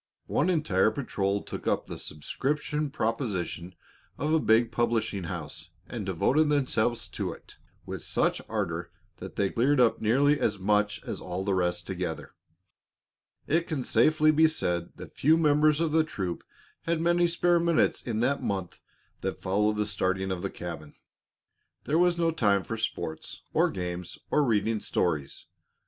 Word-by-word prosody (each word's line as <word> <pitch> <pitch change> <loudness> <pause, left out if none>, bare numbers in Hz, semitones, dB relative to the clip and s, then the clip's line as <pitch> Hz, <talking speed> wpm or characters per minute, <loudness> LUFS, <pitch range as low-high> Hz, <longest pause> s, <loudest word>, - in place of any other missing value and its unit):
One 155 - +1
entire 110 - +2
patrol 100 -5 -2
took - - -7
up - - +1
the - - -7
subscription 150 - -2
proposition 105 -8 -3 0.4
of 150 +3 0
a 160 - +4
big 115 -3 +3
publishing 115 -5 0
house - - -6 0.2
and 110 -5 -6
devoted 140 - +2
themselves 120 -5 +1
to - - -3
it - - -13 0.3
with - - -6
such - - +1
ardor 85 +1 -2 0.3
that - - -9
they 100 -1 0
cleared 130 +4 +2
up 120 -2 +3
nearly 140 +7 +3
as 105 - +1
much 105 +2 +1
as - - -5
all 95 +2 -4
the 100 - +1
rest 90 -2 0
together. - - -4 1.1
It 165 +3 +1
can 145 -5 -2
safely 155 +7 +4
be 160 +1 +5
said 90 - -2
that - - -10
few 155 +4 +4
members 150 -1 +4
of 165 -2 +1
the 160 +1 +4
troop 95 - -4 0.4
had 170 -1 +1
many 175 +1 +3
spare 175 0 +2
minutes 170 -1 +2
in 115 -2 -2
the 140 +4 +3
month 95 -3 -3 0.4
that - - -4
followed 105 +3 +1
the 105 0 0
starting 95 -2 -1
of 90 -2 -3
the 100 - -2
cabin. 80 -5 -8 0.9
There 155 +3 +1
was 175 -1 +3
no 165 -1 +2
time 100 -10 +2
for 115 - -4
sports 85 -7 -4
or - - +3
games 90 -1 -5
or 150 - +4
reading 110 -3 +1
stories. 75 -6 -1
115 Hz, 160 wpm, -28 LUFS, 95-150 Hz, 1.1 s, be